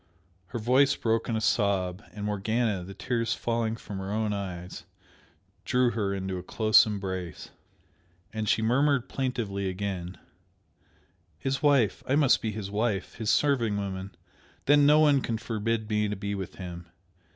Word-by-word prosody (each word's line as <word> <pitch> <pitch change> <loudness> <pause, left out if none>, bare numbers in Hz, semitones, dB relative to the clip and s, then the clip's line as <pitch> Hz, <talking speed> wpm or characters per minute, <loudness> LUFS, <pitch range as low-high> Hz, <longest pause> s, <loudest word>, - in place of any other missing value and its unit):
Her 120 - -5
voice 130 +5 +3
broke 115 0 0
in 115 - 0
a - - +1
sob, 100 -4 +1
and 105 -1 -6
Morgana, 105 -1 0
the 95 +2 -9
tears 115 -2 -1
falling 115 -1 -1
from 100 -3 -7
her 95 +1 -5
own 110 0 0
eyes, 90 -3 -6 0.8
drew 125 -1 +2
her 105 -3 -1
into 95 -1 -3
a - - -6
close 110 +4 +4
embrace. 95 -5 -5 0.8
And 110 -1 -2
she 110 - +2
murmured 135 +2 +2
plaintively 110 -7 -2
again 95 -2 -4 1.2
"His 135 +1 -2
wife! 140 -9 +3
I 135 - +2
must 145 -4 +4
be 110 - -2
his 105 -2 -6
wife, 105 -1 -1
his 110 -2 -3
serving 120 -8 +2
woman 95 -1 -5 0.5
then 145 0 +5
no 150 +1 +6
one 145 -3 +5
can 115 -2 -2
forbid 115 -1 -2
me 105 -1 +1
to 105 - -2
be 100 +1 -4
with 95 -2 -5
him! 85 -2 -8
110 Hz, 160 wpm, -28 LUFS, 100-120 Hz, 1.2 s, no